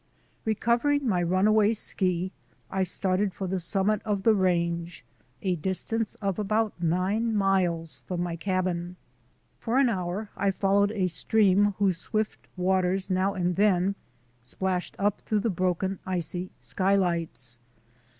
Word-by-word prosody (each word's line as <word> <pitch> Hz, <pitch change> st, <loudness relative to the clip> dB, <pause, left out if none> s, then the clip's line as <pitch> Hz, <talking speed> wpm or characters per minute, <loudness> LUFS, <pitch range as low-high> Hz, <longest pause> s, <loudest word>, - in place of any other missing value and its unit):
Recovering 240 Hz, +6 st, +1 dB
my 185 Hz, -5 st, +2 dB
runaway 205 Hz, +5 st, +3 dB
ski, 185 Hz, -4 st, -1 dB, 0.4 s
I 190 Hz, -, 0 dB
started 190 Hz, +1 st, 0 dB
for 195 Hz, -, -4 dB
the 185 Hz, 0 st, -1 dB
summit 195 Hz, +4 st, +1 dB
of 205 Hz, -3 st, -1 dB
the 225 Hz, -, +5 dB
range, 170 Hz, -, 0 dB, 0.4 s
a 185 Hz, -2 st, 0 dB
distance 195 Hz, +6 st, -2 dB
of 200 Hz, -1 st, -2 dB
about 215 Hz, +1 st, +1 dB
nine 190 Hz, +7 st, +1 dB
miles 180 Hz, -5 st, 0 dB
from 175 Hz, -1 st, -2 dB
my 175 Hz, -1 st, -3 dB
cabin. 180 Hz, 0 st, -2 dB, 0.6 s
For 235 Hz, +2 st, -1 dB
an 270 Hz, -2 st, +5 dB
hour 190 Hz, +1 st, -3 dB
I 200 Hz, -, +1 dB
followed 200 Hz, +1 st, +2 dB
a 195 Hz, -4 st, 0 dB
stream 205 Hz, +2 st, +3 dB
whose 195 Hz, -4 st, +2 dB
swift 215 Hz, +4 st, -3 dB
waters 185 Hz, +1 st, +1 dB
now 190 Hz, +2 st, +1 dB
and 180 Hz, -1 st, 0 dB
then 195 Hz, -2 st, +3 dB, 0.5 s
splashed 180 Hz, +8 st, -2 dB
up 205 Hz, 0 st, 0 dB
through 215 Hz, -2 st, 0 dB
the 225 Hz, -, 0 dB
broken, 185 Hz, +1 st, -1 dB
icy 180 Hz, 0 st, -3 dB
skylights. 170 Hz, -, -1 dB
190 Hz, 135 wpm, -27 LUFS, 180-205 Hz, 0.6 s, the